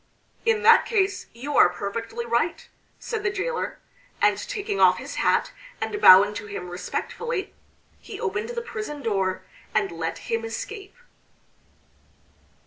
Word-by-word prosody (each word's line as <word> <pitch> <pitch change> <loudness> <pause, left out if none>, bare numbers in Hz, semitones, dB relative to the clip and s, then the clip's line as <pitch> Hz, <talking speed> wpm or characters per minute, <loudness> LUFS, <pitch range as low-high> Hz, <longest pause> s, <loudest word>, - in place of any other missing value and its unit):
"In 450 -1 +2
that 460 +1 +7
case 395 -3 0
you 270 +5 -5
are - - +7
perfectly 225 +6 -5
right," 235 +9 -1 0.3
said 450 -3 -4
the 400 - 0
jailor; 425 +4 -3 0.4
and - - +4
taking 415 -4 -4
off - - +6
his - - -7
hat - - +2 0.3
and 415 - -3
bowing 200 +3 +8
to 205 0 -6
him 180 -3 -6
respectfully 385 - -4 0.5
he 420 -3 -9
opened 445 0 -2
the 475 -1 -4
prison 425 -11 -6
door 190 -3 -1 0.3
and 200 -4 +1
let 165 -1 -3 0.2
him 230 0 0
escape. 395 - -6
345 Hz, 135 wpm, -25 LUFS, -, 0.5 s, bowing